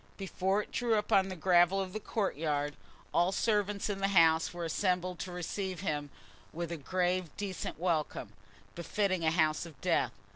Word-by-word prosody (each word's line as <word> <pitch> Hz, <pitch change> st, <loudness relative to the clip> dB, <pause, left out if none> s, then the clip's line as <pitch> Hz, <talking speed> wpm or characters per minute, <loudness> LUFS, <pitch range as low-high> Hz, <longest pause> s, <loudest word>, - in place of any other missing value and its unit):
Before 195 Hz, +1 st, 0 dB
it -, -, -17 dB
drew 235 Hz, -2 st, +1 dB
up 210 Hz, +1 st, -1 dB
on 195 Hz, -2 st, +4 dB
the 185 Hz, -, -4 dB
gravel 175 Hz, +2 st, +4 dB
of 190 Hz, -1 st, -3 dB
the 215 Hz, -, -3 dB
courtyard, 150 Hz, -, -1 dB, 0.4 s
all 175 Hz, +1 st, +4 dB
the -, -, -3 dB
servants 205 Hz, -2 st, +1 dB
in 205 Hz, -2 st, -2 dB
the 195 Hz, -, +2 dB
house 165 Hz, -4 st, +4 dB
were 175 Hz, -1 st, -5 dB
assembled 180 Hz, +1 st, 0 dB
to 180 Hz, +1 st, -5 dB
receive 180 Hz, +1 st, -4 dB
him 150 Hz, -5 st, -2 dB, 0.4 s
with 170 Hz, +1 st, -4 dB
a 170 Hz, -, -3 dB
grave, 180 Hz, +3 st, 0 dB
decent 195 Hz, -3 st, -4 dB
welcome, 155 Hz, -, -1 dB, 0.4 s
befitting 185 Hz, +1 st, -1 dB
a 160 Hz, -, +4 dB
house 160 Hz, 0 st, +1 dB
of 155 Hz, -5 st, -15 dB
death. -, -, +1 dB
180 Hz, 180 wpm, -32 LUFS, 165-195 Hz, 0.4 s, on